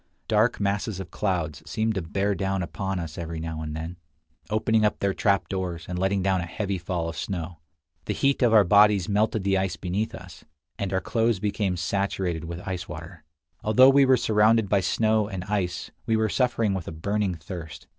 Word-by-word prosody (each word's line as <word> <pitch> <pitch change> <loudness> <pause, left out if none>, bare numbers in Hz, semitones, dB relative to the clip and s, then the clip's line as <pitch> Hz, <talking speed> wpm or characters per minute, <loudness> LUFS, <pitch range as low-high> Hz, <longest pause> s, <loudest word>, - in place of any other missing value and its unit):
Dark 110 +2 +2
masses 100 0 -1
of 95 - -7
clouds 80 -7 -2
seemed 110 +7 0
to 95 - -2
bear 100 +5 -1
down 95 0 -1
upon 95 +2 -3
us 85 -3 -5
every 85 -1 -5
now 80 -1 -4
and 75 -1 -5
then, 80 +3 -6 0.5
opening 110 +1 +2
up 105 - +2
their 100 -1 0
trapdoors, 95 -4 -1
and 90 0 -4
letting 95 0 +1
down 95 -1 +2
a 90 - -5
heavy 100 +2 -3
fall 85 -1 -2
of 85 - -5
snow. 85 -3 -4 0.5
The - - -2
heat 140 0 +1
of 120 -3 +4
our 110 -2 +7
bodies 100 0 +5
melted 105 +1 +1
the 95 -1 +2
ice 95 -1 -1
beneath 105 +5 -2
us, 90 -4 -12 0.4
and 100 -2 -2
our 95 -1 0
clothes 115 0 +1
became 100 -2 -1
saturated 90 -2 -1
with 85 +2 -7
ice 90 -1 -4
water. 85 0 -9 0.4
Although 125 +5 +6
we 140 0 +5
were 130 -1 +5
surrounded 110 -1 +3
by 100 - +4
snow 110 +3 +1
and 95 -4 -5
ice, 95 -3 -2 0.2
we 110 -1 +3
were 110 0 +1
suffering 115 -4 +1
with 95 -4 -4
a - - -4
burning 100 +3 -1
thirst. 80 -1 -8
95 Hz, 195 wpm, -26 LUFS, 85-105 Hz, 0.5 s, our